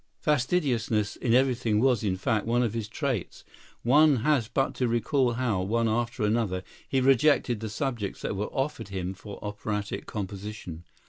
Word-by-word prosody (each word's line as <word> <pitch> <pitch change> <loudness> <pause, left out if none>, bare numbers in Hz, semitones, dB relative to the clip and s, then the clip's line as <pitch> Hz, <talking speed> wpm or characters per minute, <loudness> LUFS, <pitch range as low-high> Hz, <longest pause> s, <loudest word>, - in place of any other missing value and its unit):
Fastidiousness 125 - +1
in 120 -1 +1
everything 125 -4 +2
was, 125 -2 +3
in 95 -3 0
fact, 110 +2 0
one 120 +1 +2
of 115 -3 -1
his 115 -2 -3
traits. 130 - -3 0.4
One 145 +4 +6
has 145 -7 +3
but 135 +3 0
to 125 - +1
recall 120 +2 +1
how, 115 -6 0
one 115 +5 +1
after 115 0 -1
another, 105 -4 0 0.3
he 135 - +2
rejected 135 -2 +3
the 110 0 -4
subjects 115 -3 -3
that - - -2
were 105 +2 -2
offered 135 -5 -3
him 95 -2 -4
for 100 +2 -10
operatic 105 0 -4
composition. 100 -4 -6
115 Hz, 160 wpm, -27 LUFS, 105-130 Hz, 0.4 s, One